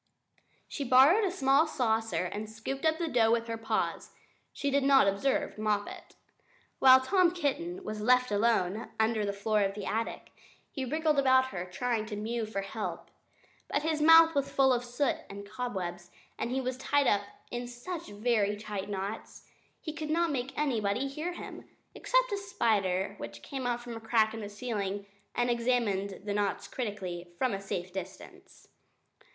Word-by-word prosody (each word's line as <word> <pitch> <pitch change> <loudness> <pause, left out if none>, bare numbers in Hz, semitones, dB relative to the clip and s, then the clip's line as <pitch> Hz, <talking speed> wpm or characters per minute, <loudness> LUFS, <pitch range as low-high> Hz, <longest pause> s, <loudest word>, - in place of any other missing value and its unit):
She 285 - -4
borrowed 275 - +6
a - - +1
small 280 -2 +3
saucer 225 - 0
and 210 +4 -5
scooped 245 +7 -5
up 315 0 +2
the 340 -1 -2
dough 230 -6 +3
with 230 0 +2
her 230 0 -3
paws. 225 0 -2 0.4
She 280 - -2
did 280 +1 +3
not 270 -5 +6
observe 200 +3 0
Moppet. 210 -1 -2 0.6
While 260 0 +8
Tom 365 +5 +3
Kitten 345 +2 -2
was 215 -7 -5
left 250 +1 +3
alone 210 -1 +1
under 220 -1 +2
the 200 - 0
floor 210 +1 0
of 195 0 0
the 205 - -5
attic, 225 +1 -3 0.4
he 270 -3 -4
wriggled 310 +2 +1
about 260 -1 +4
and 180 0 -5
tried 220 +2 -1
to 215 - -5
mew 220 +2 -3
for 200 -2 -3
help. 210 +2 -5 0.6
But 290 - -1
his 315 -1 0
mouth 325 +1 +8
was 280 -2 0
full 265 -1 +4
of 245 0 0
soot 245 +3 0
and 200 0 -8
cobwebs, 185 -7 -5 0.3
and - - -3
he 265 +2 -1
was 255 0 -3
tied 285 +2 +1
up 205 -4 +3 0.3
in 245 0 -4
such 315 +8 -7
very 210 -1 0
tight 205 -2 -5
knots, 200 +2 -5 0.3
he 310 - -6
could 310 -1 -5
not 335 +1 +2
make 265 -1 -3
anybody 245 -3 0
hear 310 +6 -4
him. - - -9 0.2
Except - - +1
a 405 - 0
spider 210 - 0
who - - -4
came 245 - -6
out 240 0 -2
of 240 -1 -6
a - - -6
crack 225 -1 +2
in 225 - -6
the 205 -2 -6
ceiling 205 -3 -3 0.3
and 245 0 +1
examined 230 -5 0
the 205 - -2
knots 205 -1 -1
critically, 190 -7 -5
from 255 +1 +1
a 195 - -3
safe 185 -2 -4
distance. 190 0 -9
235 Hz, 175 wpm, -30 LUFS, 205-275 Hz, 0.6 s, While